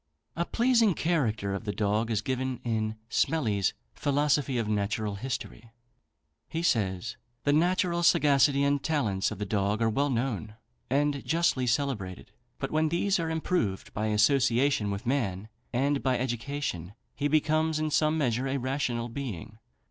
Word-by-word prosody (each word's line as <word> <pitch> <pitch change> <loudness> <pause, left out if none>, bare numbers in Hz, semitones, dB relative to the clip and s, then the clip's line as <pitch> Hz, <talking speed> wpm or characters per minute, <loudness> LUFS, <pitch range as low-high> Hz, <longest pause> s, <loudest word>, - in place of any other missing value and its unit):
A 170 - -1
pleasing 235 -5 +3
character 115 - 0
of 100 - -4
the 105 - -2
dog 105 +2 0
is 110 -2 0
given 130 0 -2
in 110 -2 -1
Smellie's 115 - +1 0.2
"Philosophy 145 -2 +1
of 115 -2 -1
Natural 105 0 -1
History." 115 +1 -5 0.8
He 165 +1 -3
says: 110 - 0 0.3
"The 145 - +3
natural 175 +2 +2
sagacity 145 -4 +4
and 140 0 +2
talents 110 -13 0
of - - -6
the 105 - -3
dog 100 +1 0
are 115 -1 +2
well 140 +6 +1
known, 115 -4 -2 0.3
and 140 +1 +1
justly 160 -6 +1
celebrated. 115 -7 -2 0.3
But 135 - -4
when 155 0 +2
these 185 +4 +1
are 165 -1 -1
improved 160 - -1
by 110 +1 -1
association 120 +1 +3
with 100 0 -4
man, 110 -6 -1 0.2
and 135 +3 +1
by 130 -2 +1
education, 120 - -3 0.2
he 145 - -1
becomes, 155 +1 +2
in 155 0 -1
some 155 +1 +2
measure, 130 -3 0
a 135 +1 -1
rational 130 -2 -1
being. 110 -4 -6
130 Hz, 150 wpm, -28 LUFS, 110-145 Hz, 0.8 s, sagacity